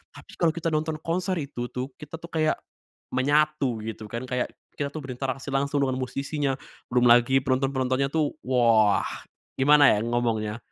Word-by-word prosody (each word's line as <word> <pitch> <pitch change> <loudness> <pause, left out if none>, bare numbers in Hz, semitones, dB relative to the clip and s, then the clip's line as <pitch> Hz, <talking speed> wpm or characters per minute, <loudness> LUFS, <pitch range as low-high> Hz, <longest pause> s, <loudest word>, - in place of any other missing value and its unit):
Habis - - -14
kalau 170 -2 +4
kita 165 0 -1
nonton 155 0 0
konser 180 +2 -1
itu 135 -4 -5
tuh, 125 +2 -4
kita 150 +1 -8
tuh 170 - -9
kayak 155 -1 +2 0.6
menyatu 145 -3 +1
gitu 110 -1 -6
kan, 115 +2 -4
kayak 125 -1 -1 0.3
kita 140 -1 -1
tuh 155 - -4
berinteraksi 130 0 -4
langsung 140 +1 +1
dengan 130 -1 -1
musisinya. 140 +2 -2 0.4
Belum 125 0 +3
lagi 120 +3 +6
penonton 135 0 +1
penontonnya 130 +1 0
tuh, 155 -2 +1
wah! 115 -5 +4 0.5
Gimana 145 +1 +6
ya 105 - 0
ngomongnya? 115 -2 -1
135 Hz, 160 wpm, -26 LUFS, 125-150 Hz, 0.6 s, lagi